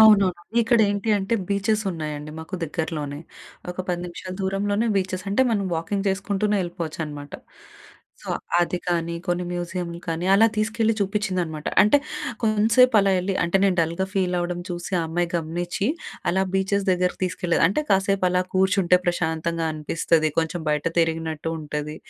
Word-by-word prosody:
అవునవును! 195 -5 +6 0.2
ఇక్కడ 235 +1 +3
ఏంటి 200 +2 -2
అంటే, 195 +4 -1
బీచెస్ 205 +2 +1
ఉన్నాయండి 150 -3 -5
మాకు 160 +4 -7
దగ్గరలోనే. 150 -3 -3 0.5
ఒక 180 - -8
10 175 -1 -1
నిమిషాలు 185 +1 -7
దూరంలోనే 205 +3 0
బీచెస్ 185 -1 -1
అంటే, 205 +6 +3
మనం 205 -3 +1
వాకింగ్ 195 +5 -2
జేసుకుంటూనే 200 +2 0
యెళ్ళిపోవచ్చు 170 -3 -4
అన్నమాట. 145 -1 -8 0.9
సో, - - -10 0.3
అది 175 +1 0
కానీ, 170 -1 0
కొన్ని 175 0 0
మ్యూజియంలు 175 -1 -4
కానీ 165 +2 -1
అలా 220 +3 +6
తీసుకెళ్ళి 225 +1 +1
చూపిచ్చిందనమాట. 185 -6 -1 0.2
అంటే 210 +8 +5 0.4
కొంసేపు 225 +3 +4
అలా 195 0 +2
వెళ్ళి, 185 +2 -1
అంటే 170 +2 +2
నేను 190 -2 +3
డల్‌గా 170 +4 0
ఫీల్ 185 -2 +1
అవ్వడం 175 0 -2
చూసి, 175 +1 -5
ఆ - - -1
అమ్మాయి 175 +1 0
గమనిచ్చి 175 +4 -2 0.4
అలా 190 +2 +2
బీచెస్ 195 +1 +1
దగ్గరకి 180 0 +1
తీసుకెళ్ళేది. 180 -1 0
అంటే, 255 +11 0
కాసేపు 195 -1 +2
అలా 180 0 +2
కూర్చుంటే 185 -1 +4
ప్రశాంతంగా 165 -1 0
అనిపిస్తది. 155 +1 +1
కొంచెం 165 +1 0
బయట 150 -1 0 0.2
తిరిగినట్టు 160 -1 -1
ఉంటది. 150 0 -4
180 Hz, 150 wpm, -24 LUFS, 165-200 Hz, 0.9 s, అవునవును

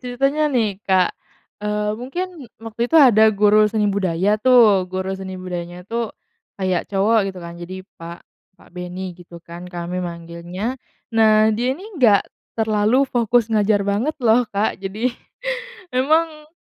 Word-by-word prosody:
ceritanya 275 +5 0
nih, 220 -8 0
Kak, 185 -1 +3 0.5
eee, 210 0 -1
mungkin 335 +1 -6
waktu 225 0 -10
itu 325 - +3
ada 220 -7 +7
guru 210 0 +4
seni 215 -1 0
budaya 195 +2 0
tuh, 215 -7 +5
guru 190 +1 -3
seni 190 -1 -6
budayanya 180 -1 -6
tuh 230 +3 -3 0.5
kayak 185 -3 -1
cowok 205 +1 +2
gitu 190 -1 -7
kan, 170 - -7
jadi 185 +2 -8 0.2
Pak 170 +1 -9 0.3
Pak - - -20
Benny 180 +1 -6
gitu 175 -1 -14
kan, 175 +1 -9
kami 175 0 -4
manggilnya. 175 +7 -6 0.3
Nah, 220 -1 +4
dia 245 +5 -1
ini 370 - -11
enggak 235 - +4 0.3
terlalu 220 +4 +2
fokus 235 -3 +1
ngajar 205 -1 +2
banget 210 +10 -1
loh, 230 +1 +4
Kak, 205 -1 -1
jadi 215 +6 -2 0.8
memang 305 +3 +1
210 Hz, 145 wpm, -20 LUFS, 185-240 Hz, 0.8 s, ada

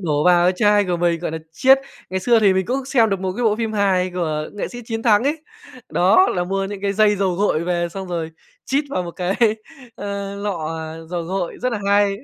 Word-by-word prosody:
đổ 150 -4 0
vào 175 -1 +5
cái 180 - +4
chai 205 0 +4
của 180 -2 -1
mình, 170 -1 0
gọi 175 - -3
nà, 160 - -4
chiết. 265 +9 +5 0.3
Ngày 190 0 -2
xưa 230 +3 +3
thì 200 -3 +5
mình 190 -1 0
cũng 265 +4 -2
xem 240 -4 +3
được 195 -1 -1
một 190 -1 -2
cái 245 - -1
bộ 215 -2 +3
phim 225 -1 -2
hài 190 -3 +1
của 155 -4 -2
nghệ 205 - -4
sĩ 245 -1 -9
Chiến 225 -1 -4
Thắng 215 -2 +4
ấy, 300 +2 -1 0.5
đó, 195 - +4
là 180 - 0
mua 195 +2 -1
những 195 0 -6
cái 200 0 0
dây 210 0 +3
dầu 190 -2 0
gội 175 -4 0
về 175 -1 -1
xong 190 +2 -7
rồi 165 -2 -3 0.3
chít 280 +3 0
vào 185 - -1
một 175 - -6
cái, 180 +2 -2 0.6
ơ, 200 -1 -5
lọ 170 -6 -3 0.3
dầu 175 -1 -2
gội, 180 0 -4
rất 250 0 0
là 220 - -2
hay. 200 0 +3
195 Hz, 240 wpm, -20 LUFS, 175-210 Hz, 0.6 s, vào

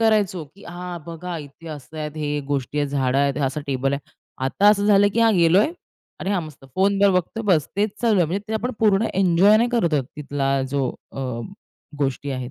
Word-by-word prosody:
करायचो, 205 -7 +2
की 200 - -16
हां, 175 0 -6
बघा 170 +1 -6
इथे 145 +3 -11
असं 155 0 -9
आहे, 150 0 -2
हे 145 0 -1
गोष्टी 140 +1 -2
आहेत, 145 -1 +1
झाडं 135 -1 +1
आहेत, 140 0 +1
असं 140 +3 -3
टेबल 135 0 0
आहे. 140 -1 -5 0.3
आता 195 +10 +3
असं 205 -1 +4
झालं 205 -1 +5
की 230 - +2
हां, 225 -1 +5
गेलोय. 175 +3 +5 0.5
"अरे, 195 - -2
हां 185 -4 +1
मस्त." 150 -3 -11
फोनवर 200 +1 +3
बघतोय, 225 +6 -7
बस. 150 -3 -1
तेच 210 +1 +1
चालू 225 -3 +3
आहे 175 -3 +3
म्हणजे. 195 +5 -2
ते - - -3
आपण 245 +3 -1
पूर्ण 215 0 +3
एन्जॉय 190 +2 +5
नाही 235 +2 +2
करत 170 -10 +2
आहोत 140 - +1
तिथला 140 -2 -2 0.2
जो 140 -2 0 0.2
अ, 135 - -6 0.8
गोष्टी 140 0 -1
आहेत 130 -1 -4
170 Hz, 205 wpm, -22 LUFS, 140-200 Hz, 0.8 s, झालं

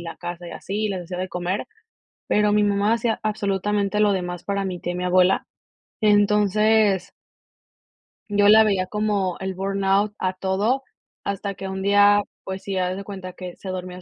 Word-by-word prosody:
la 170 -1 -7
casa 175 0 -6
y - - -8
así, 210 +2 -3
les 185 -3 -4
hacia 180 +1 -6
de 185 0 -3
comer, 180 +2 -3 0.6
pero 210 0 +3
mi 210 0 +3
mamá 205 +2 +2
hacía 230 -1 -1
absolutamente 205 -1 0
lo 210 -1 +4
demás 180 -2 -3
para 200 -1 -1
mi 180 -2 -5
tía 175 - -3
y - - -4
mi 180 - -3
abuela, 180 +1 +3 0.6
entonces 210 -1 +3 1.2
Yo 205 0 +4
la 220 +1 +8
veía 195 -4 +1
como 205 -3 -1
el 190 -1 -4
burnout 195 +1 +1
a 185 0 0
todo, 200 +8 0 0.4
hasta 200 0 -3
que 195 - -6
un 190 0 -4
día, 205 +1 +5 0.2
pues 190 0 -5
sí, 195 -1 -4
haz 185 0 0
de 200 - -6
cuenta 190 -2 -8
que 180 -1 -8
se 190 - -9
dormía 185 0 -6
195 Hz, 180 wpm, -23 LUFS, 185-205 Hz, 1.2 s, la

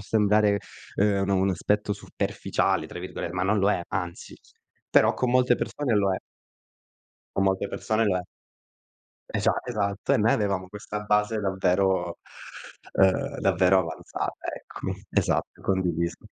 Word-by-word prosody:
sembrare 105 -1 +3 0.4
ehm, 100 -1 +2
un 95 - -1
un 95 0 +3
aspetto 105 +2 0
"superficiale" 100 - -1
tra - - -8
virgole - - -5
ma 90 +1 -1
non 105 +2 +2
lo 100 +2 +4
è, 90 - +1
anzi. 90 -3 -4 0.6
Però - - +5
con 125 -1 0
molte 125 -1 +4
persone 130 -1 -1
lo 100 -2 +3
è. - - -2 1.2
Con 100 - +3
molte 95 +1 +1
persone 110 +1 0
lo 95 - +2
è. 90 - -1 1.1
Esa - - +2
esatto, 105 -4 -1
e - - +5
noi 110 +2 +3
avevamo 100 -3 0
questa 105 +1 -6
base 105 +1 +1
davvero 95 -2 +1 0.7
ehm, 95 -1 +2
davvero 95 0 +4
avanzata, 80 -2 -5
eccomi. - - -7
Esatto, - - 0
condiviso. 85 -3 -1
100 Hz, 140 wpm, -26 LUFS, 95-105 Hz, 1.2 s, Però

